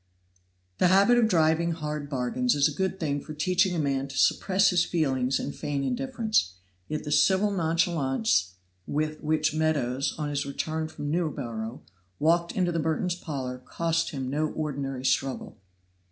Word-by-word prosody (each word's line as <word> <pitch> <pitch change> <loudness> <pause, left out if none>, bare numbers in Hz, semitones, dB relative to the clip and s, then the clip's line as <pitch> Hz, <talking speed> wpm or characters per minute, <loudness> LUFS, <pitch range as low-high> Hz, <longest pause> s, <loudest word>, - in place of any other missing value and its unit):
The - - +5
habit 200 +7 +5
of 230 - +4
driving 165 -2 +2
hard 150 -2 -4
bargains 145 - 0
is 145 +1 +4
a 150 - -4
good 190 +3 -2
thing 145 -3 -1
for 155 - -9
teaching 180 +3 +2
a - - -1
man 140 -2 0
to 135 - -8
suppress 195 0 +3
his 175 -1 +3
feelings 135 -6 0
and 145 - -4
feign 140 -1 -2
indifference, 230 - 0 0.3
yet 155 - -3
the 150 - -5
civil 190 +7 +4
nonchalance 165 - +1 0.3
with 155 +1 -2
which 155 0 +1
Meadows, 140 -4 0
on 150 -1 -2
his 145 -1 -1
return 155 +3 -3
from 145 -2 -5
Newborough, 130 -8 -3 0.4
walked 170 +2 +2
into 180 -2 +1
the 165 - -1
Merton's 160 +3 0
parlor 135 -7 -5
cost 165 +5 -1
him 135 -3 -4
no 150 +4 0
ordinary 135 -4 -4
struggle. 135 0 -1
155 Hz, 160 wpm, -27 LUFS, 140-175 Hz, 0.4 s, The